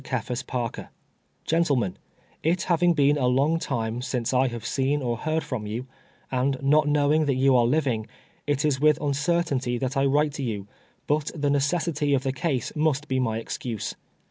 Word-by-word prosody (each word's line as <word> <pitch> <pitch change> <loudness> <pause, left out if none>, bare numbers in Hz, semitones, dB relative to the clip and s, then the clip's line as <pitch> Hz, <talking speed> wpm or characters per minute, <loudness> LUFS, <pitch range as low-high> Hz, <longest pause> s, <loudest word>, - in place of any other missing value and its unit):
Cephas 125 +1 -3
Pareer: 120 -3 -4 0.3
" - - -44
Gentlemen 140 - +1 0.3
— - - -34
It 180 +2 -1
having 175 0 +3
been 145 0 +3
a 125 - +2
long 140 +6 +2
time 115 -4 -2
since 125 -1 -2
I 130 +1 +3
have 120 -3 -6
seen 135 +2 0
or 120 -1 0
heard 155 +6 -1
from 110 -5 -4
you, 115 +4 -4 0.5
and 130 +1 +1
not 150 +2 +4
knowing 150 +1 +3
that 135 - +2
you 135 0 +4
are 120 -1 +4
living, 125 -6 0 0.4
it 145 0 +1
is 140 -3 +1
with 150 -1 +4
uncertainty 145 -3 0
that 130 +3 -2
I 135 0 +2
write 145 +2 +2
to 140 - -4
you, 105 -5 -3 0.4
but 150 0 0
the 145 -2 0
necessity 145 0 +1
of 130 - -1
the 135 -1 -1
case 135 0 -2
must 150 -1 +1
be 130 -2 0
my 115 -3 0
excuse. 115 -2 -4
135 Hz, 190 wpm, -25 LUFS, 125-150 Hz, 0.5 s, not